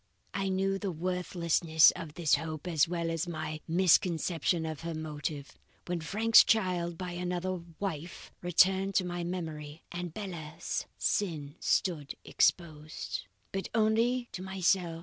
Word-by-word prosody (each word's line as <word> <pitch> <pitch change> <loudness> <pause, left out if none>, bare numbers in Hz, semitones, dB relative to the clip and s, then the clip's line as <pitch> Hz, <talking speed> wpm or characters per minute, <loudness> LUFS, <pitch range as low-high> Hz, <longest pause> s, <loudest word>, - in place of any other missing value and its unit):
"But - - -2
I 195 0 0
knew 195 +1 0
the 200 - -2
worthlessness 170 -2 +3
of 155 -2 -7
this 165 -5 +1
hope 155 +1 0
as 165 -2 +3
well 170 -1 -2
as 165 +1 -2
my 155 -2 -4
misconception 170 -1 +2
of 155 -2 -4
her 165 -1 -4
motive, 150 -2 -5 0.3
when 175 -1 -2
Frank's 220 +8 +6
child 180 -6 +1
by 180 0 -5
another 180 +1 -2 0.2
wife 170 -4 -5
returned 190 +2 +3
to 185 - +3
my 175 -1 -3
memory, 160 -4 -5
and 175 0 -4
Bella's 170 -4 -5
sin 155 -8 -1
stood 155 -7 0
exposed." 155 - -1 0.2
"But 195 0 -3
only 230 +3 +2
to 185 - -6
myself. 185 -3 0
175 Hz, 140 wpm, -31 LUFS, 160-185 Hz, 0.3 s, Frank's